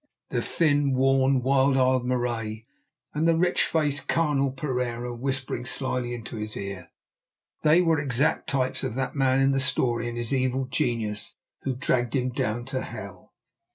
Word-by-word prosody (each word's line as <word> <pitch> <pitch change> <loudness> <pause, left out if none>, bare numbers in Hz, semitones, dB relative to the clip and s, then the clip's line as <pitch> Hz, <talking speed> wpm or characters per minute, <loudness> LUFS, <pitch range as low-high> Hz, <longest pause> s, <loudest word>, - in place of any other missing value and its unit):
The - - -1
thin, 145 -4 +2
worn, 135 0 +3
wild 135 +1 +3
eyed 130 -1 +3
Marais, 115 -3 -2 0.5
and 155 +2 +1
the 165 - +4
rich 175 +1 +2
faced, 150 -3 0
carnal 145 -4 +2
Pereira 125 -3 -3
whispering 130 0 -3
slyly 125 -1 -2
into 115 0 -7
his 105 0 -5
ear; 100 -2 -6 0.7
they 160 +3 +5
were 165 -3 +2
exact 140 0 0
types 130 -1 -1
of 130 -4 -3
that 135 +3 -2
man 135 -1 +3
in 135 0 +4
the 135 - +1
story 120 -3 +1
and 120 - -6
his 120 +2 -2
evil 130 0 +1
genius 115 -6 -2 0.3
who 135 -2 -2
dragged 120 -1 0
him 130 -1 0
down 120 -3 -2
to 130 0 -3
hell. - - -9
130 Hz, 160 wpm, -26 LUFS, 120-140 Hz, 0.7 s, they